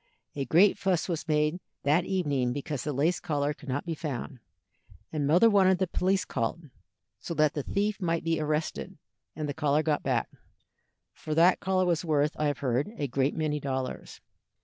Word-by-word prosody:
A 140 -1 -2
great 175 +10 +4
fuss 185 -4 +1
was 170 -2 -3
made 150 +2 +1 0.2
that 155 +5 +3
evening 145 -10 0
because 145 0 -4
the 150 - -2
lace 150 +6 +1
collar 145 -2 -1
could 145 -1 -12
not 135 +3 -2
be 170 - -2
found, 145 -4 -5 0.7
and 145 -2 0
mother 175 +10 +6
wanted 190 -3 +4
the 190 - +1
police 190 +2 0
called, 140 +6 -3 0.5
so 170 - -5
that 155 -1 +3
the 145 - -2
thief 205 +7 -1
might 165 -2 0
be 165 -1 0
arrested 155 +4 -2 0.4
and 155 0 -3
the 145 - -3
collar 150 0 +1
got 150 -2 0
back, - - -1 0.8
for 155 - -5
that 170 +3 +5
collar 185 -1 +1
was 170 -2 +1
worth, 150 -2 +2
I 150 - 0
have 145 -2 -1
heard, 130 - 0
a 145 - -1
great 135 +2 0
many 155 -2 -1
dollars. 130 -2 -4
155 Hz, 185 wpm, -28 LUFS, 145-175 Hz, 0.8 s, mother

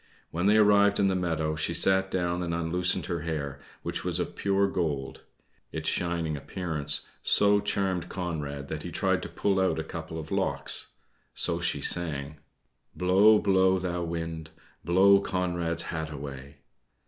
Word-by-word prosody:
When 90 +4 0
they 105 +1 +5
arrived 100 -1 +5
in 100 -1 +3
the 95 - 0
meadow, 80 -4 -1
she 75 - -1
sat 95 0 +3
down 90 -1 -1
and 85 -1 -2
unloosened 85 +2 0
her 85 -1 -2
hair, 75 -4 -4 0.2
which - - -3
was - - 0
of - - -3
pure 100 0 +1
gold. 75 -8 -3 0.5
Its - - -5
shining 85 -3 -1
appearance 75 0 -2 0.2
so 100 0 +4
charmed 95 -3 -1
Conrad 75 -6 -4
that - - -5
he - - -6
tried - - 0
to - - -6
pull 100 -2 0
out 95 0 +1
a 80 - -2
couple 80 0 -7
of 80 0 -9
locks. - - 0 0.5
So - - +1
she - - -1
sang: 75 -4 -1 0.6
"Blow, 95 +4 +5
blow, 95 -2 +3
thou 90 -1 -2
wind, 80 -1 -4 0.3
Blow 100 +3 +5
Conrad's 85 -3 -1
hat 80 -1 -4
away." 70 -1 -9
85 Hz, 160 wpm, -28 LUFS, 80-95 Hz, 0.6 s, they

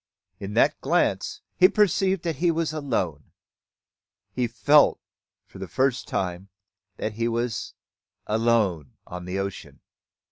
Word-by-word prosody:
In 100 +1 -6
that - - +3
glance - - 0
he 185 - +6
perceived 195 -3 +2
that 165 -5 -2
he 175 +4 +2
was 165 -1 0
alone, 95 - -3 1.0
he 125 -1 0
felt 145 +6 +4 0.5
for - - -14
the 95 - -6
first 130 +7 0
time 90 +1 -3 0.5
that 110 - -3
he 115 +2 -1
was 120 -2 -3 0.5
alone 105 - +1
upon 90 0 -8
the 90 +1 -4
ocean! 100 -1 -5
115 Hz, 130 wpm, -25 LUFS, 95-150 Hz, 1.0 s, he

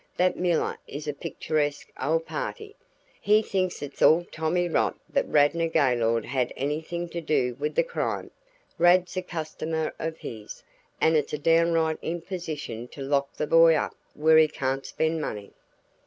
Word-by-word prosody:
"That 180 0 +3
Miller 175 -2 0
is 145 +2 -7
a 150 - -1
picturesque 145 0 -2
old 160 +4 +1
party. 435 - -5 0.5
He 215 +1 +4
thinks 185 -6 -2
it's 140 -1 -9
all 170 +2 +6
tommy 165 +3 0
rot 165 - 0
that - - 0
Radnor 155 +3 +3
Gaylord 120 -8 +2
had 130 -3 -1
anything 160 +5 -3
to 170 0 -4
do 135 -6 +1
with 150 +1 -2
the - - +4
crime - - -3 0.5
Rad's 180 +2 +4
a 185 - 0
customer 160 -2 -3
of 160 0 -3
his, 110 -2 -9 0.4
and 160 0 +3
it's 150 -1 0
a - - 0
downright 165 +1 +2
imposition 160 - -5
to 140 - -8
lock 140 0 0
the - - -2
boy 165 +1 +6
up - - -1 0.2
where 160 +1 +5
he 155 - +6
can't 135 -2 -3
spend 160 0 -1
money." 105 -8 -5
160 Hz, 160 wpm, -26 LUFS, 145-170 Hz, 0.5 s, all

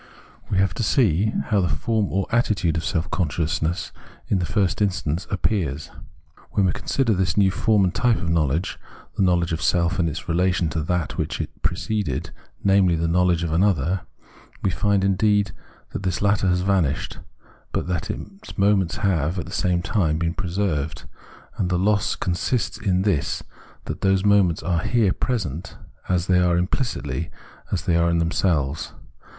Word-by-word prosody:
We 100 - 0
have 95 0 +2
to - - -4
see 105 - +3 0.2
how 105 -3 +3
the 90 - 0
form 110 -4 0
or 95 +1 0
attitude 105 -8 +1
of 80 - -2
seK 85 +1 -1
consciousness 80 0 -1 0.4
in 95 - +2
the 90 - -2
first 100 -2 0
instance 90 -4 -1
appears. 85 -7 -1 0.6
When 100 - +3
we 90 - +3
consider 125 +3 0
this 95 -1 0
new 95 -2 +4
form 105 0 +2
and 90 - +1
type 120 -2 +2
of 90 - -4
knowledge, 80 +1 0 0.4
the - - -1
knowledge 85 -3 +2
of 80 - -2
self, 85 +4 +1
in 85 -2 +2
its 80 +3 -6
relation 90 0 +1
to 80 - -1
that 90 0 -2
which - - -2
preceded, 95 -5 -2 0.3
namely, 95 -3 +4
the 85 0 0
knowledge 90 0 +2
of 85 - -2
an 80 +3 +2
other, 90 -2 +1 0.6
we 95 - +2
find, 100 +1 +1
indeed, 100 +1 +2 0.4
that - - -3
this 95 -2 -1
latter 100 -1 +2
has 90 0 +2
vanished, 90 -7 0 0.5
but - - -1
that 90 -3 -2
its 195 +1 -8
moments 100 -3 +2
have, 85 -2 +1
at 90 - -3
the - - -10
same 90 -3 0
time, 85 -4 +1
been 85 +1 -1
preserved; 90 -6 -2 0.6
and 90 - +1
the 90 - +1
loss 100 +1 +1
consists 105 +6 -1
in 95 -4 +1
this, 95 -8 0 0.4
that - - -5
those 95 0 +2
moments 100 -7 +3
are 85 +1 +1
here 110 -1 +2
present 95 - -3 0.3
as 90 -2 +1
they 90 -1 +3
are 90 -1 +3
implicitly, 90 - -2 0.4
as - - -1
they 85 - +2
are 85 0 +3
in 85 - +2
them 85 0 +1
selves. 75 -7 0
90 Hz, 175 wpm, -23 LUFS, 85-100 Hz, 0.6 s, new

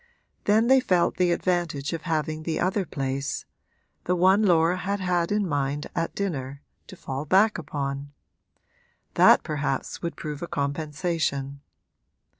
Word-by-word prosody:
Then 215 +2 +4
they 265 +2 +6
felt 180 -8 +1
the 180 -1 +3
advantage 170 -5 -1
of 165 - -3
having 155 0 -1
the 160 0 -2
other 185 +2 0
place 135 0 -3 0.6
the 180 - +1
one 190 +4 +4
Laura 175 -3 +3
had 200 +2 -2
had 180 -2 0
in 205 -2 +1
mind 145 -1 -1
at 165 -1 -2
dinner 140 -8 -4 0.2
to 190 - -10
fall 135 -5 -5
back 195 +6 +3
upon: 140 -2 -4 1.0
that - - +6
perhaps 145 -3 -3
would 170 -1 -3
prove 150 -2 -6
a 170 - -4
compensation. 145 -1 -2
165 Hz, 140 wpm, -25 LUFS, 140-185 Hz, 1.0 s, they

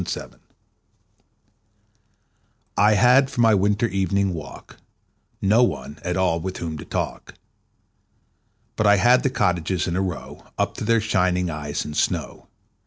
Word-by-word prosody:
Good - - -3
Hours - - -10 2.4
I 105 +1 +4
HAD 125 +5 +5
for 120 - -2
my 115 -1 +5
winter 100 +3 +2
evening 95 -1 0
walk 80 -4 -10 0.7
No 105 +5 +4
one 80 -10 -2
at 90 0 -2
all 90 -3 +1
with 95 +2 -5
whom 80 -2 -5
to - - -9
talk, - - -5 1.4
But 105 - +1
I 100 - +6
had 120 +6 +4
the 135 - +1
cottages 90 -7 0
in 85 - -2
a 95 - 0
row 90 -4 -6
Up - - -1
to - - -4
their 115 +1 +2
shining 90 -4 0
eyes 75 -1 -4
in 75 - -6
snow. - - -2
95 Hz, 150 wpm, -22 LUFS, 90-110 Hz, 2.4 s, I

